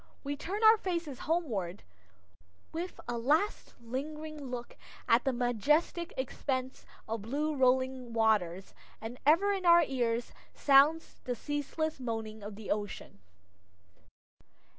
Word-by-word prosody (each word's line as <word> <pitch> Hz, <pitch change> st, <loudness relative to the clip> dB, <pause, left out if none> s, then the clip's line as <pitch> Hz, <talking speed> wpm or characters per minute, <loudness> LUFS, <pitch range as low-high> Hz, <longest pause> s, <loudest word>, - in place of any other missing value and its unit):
We 285 Hz, 0 st, -2 dB
turn 390 Hz, +9 st, -4 dB
our 440 Hz, +1 st, +8 dB
faces 340 Hz, -, -3 dB
homeward, 215 Hz, -, -1 dB, 0.9 s
with 345 Hz, +3 st, -5 dB
a 240 Hz, -1 st, -2 dB
last, 305 Hz, -, +1 dB
lingering 300 Hz, +5 st, -5 dB
look 245 Hz, -1 st, -6 dB, 0.3 s
at 230 Hz, +3 st, +4 dB
the 270 Hz, -, +3 dB
majestic 260 Hz, -, +1 dB
expanse 260 Hz, 0 st, -3 dB, 0.2 s
of 225 Hz, -1 st, -3 dB
blue 295 Hz, +8 st, -1 dB
rolling 260 Hz, -1 st, +1 dB
waters, 210 Hz, -5 st, +1 dB, 0.3 s
and 230 Hz, +3 st, -7 dB
ever 365 Hz, +7 st, +5 dB
in 385 Hz, -2 st, -3 dB
our 340 Hz, -1 st, +7 dB
ears 240 Hz, -4 st, -1 dB, 0.2 s
sounds 290 Hz, +4 st, +4 dB
the 250 Hz, -, -1 dB
ceaseless 290 Hz, +4 st, -3 dB
moaning 225 Hz, -3 st, -4 dB
of 205 Hz, 0 st, -7 dB
the 215 Hz, 0 st, -6 dB
ocean. 205 Hz, -, -4 dB
260 Hz, 120 wpm, -31 LUFS, 230-310 Hz, 0.9 s, our